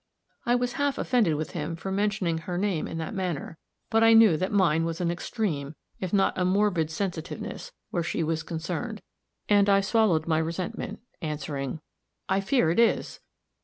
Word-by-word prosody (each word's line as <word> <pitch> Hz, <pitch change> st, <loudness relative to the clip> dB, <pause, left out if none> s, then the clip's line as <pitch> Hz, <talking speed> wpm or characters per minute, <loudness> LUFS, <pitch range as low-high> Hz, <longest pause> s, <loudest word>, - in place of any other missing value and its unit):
I 240 Hz, -, +4 dB
was 245 Hz, 0 st, 0 dB
half 285 Hz, -1 st, +1 dB
offended 225 Hz, -, +2 dB
with 155 Hz, +1 st, -3 dB
him 165 Hz, 0 st, -3 dB
for 190 Hz, +3 st, -5 dB
mentioning 195 Hz, -4 st, 0 dB
her 175 Hz, +2 st, -4 dB
name 190 Hz, -4 st, 0 dB
in -, -, -5 dB
that 160 Hz, -1 st, -4 dB
manner; 175 Hz, -4 st, -3 dB, 0.3 s
but 225 Hz, 0 st, +4 dB
I 225 Hz, 0 st, +7 dB
knew 225 Hz, -6 st, +7 dB
that 185 Hz, +5 st, -1 dB
mine 170 Hz, -6 st, +3 dB
was 165 Hz, 0 st, -3 dB
an 175 Hz, -1 st, +1 dB
extreme, 170 Hz, -, -3 dB, 0.2 s
if 185 Hz, -2 st, -3 dB
not 195 Hz, -2 st, +2 dB
a -, -, +2 dB
morbid 185 Hz, -4 st, +2 dB
sensitiveness, 175 Hz, -, -4 dB, 0.2 s
where 175 Hz, -, 0 dB
she 165 Hz, 0 st, -1 dB
was 160 Hz, 0 st, -1 dB
concerned, 175 Hz, +8 st, -4 dB, 0.4 s
and 205 Hz, -1 st, +4 dB
I 195 Hz, 0 st, +5 dB
swallowed 195 Hz, -6 st, +2 dB
my 160 Hz, -1 st, +2 dB
resentment, 170 Hz, +5 st, -4 dB, 0.2 s
answering, 145 Hz, -2 st, -4 dB, 0.5 s
"I 195 Hz, 0 st, +1 dB
fear 195 Hz, -5 st, +2 dB
it 175 Hz, -, +1 dB
is." 235 Hz, -, +2 dB
180 Hz, 175 wpm, -27 LUFS, 160-205 Hz, 0.5 s, I